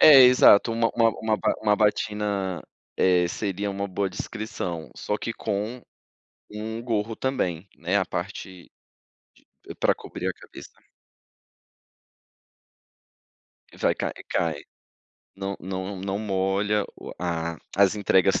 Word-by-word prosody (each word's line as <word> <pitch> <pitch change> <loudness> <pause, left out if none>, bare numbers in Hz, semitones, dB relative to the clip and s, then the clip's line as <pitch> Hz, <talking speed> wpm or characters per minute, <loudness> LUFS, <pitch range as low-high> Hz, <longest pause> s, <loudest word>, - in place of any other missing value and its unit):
É 145 -3 +10
exato, 125 -3 +7
uma 115 0 +2
uma 115 -1 +5
uma 110 -1 +1
ba - - +1
uma 105 -1 +3
batina, 105 -3 0 0.3
eh, 90 -2 +4
seria 100 +1 -2
uma 100 0 -3
boa 95 0 -2
descrição, 105 -7 -5
só 105 - -2
que 120 - -4
com 110 +3 -3 0.7
um 110 +2 -5
gorro 110 -2 -1
também, 100 -9 -1
né, 90 +4 0
a 95 - +3
parte 95 -1 -6 1.0
de - - -7
pra - - +3
cobrir - - -6
a - - 0
cabeça. - - -14 3.0
Vai, - - +3
cai - - -3 0.2
cai. 80 -4 0 0.7
Não 95 0 -4
não 95 +1 -4
não 95 +1 -2
molha 100 0 +1 0.2
o - - -7
a 85 -1 -2 0.2
as 100 0 +5
entregas 95 -2 +3
100 Hz, 125 wpm, -25 LUFS, 95-110 Hz, 3.0 s, É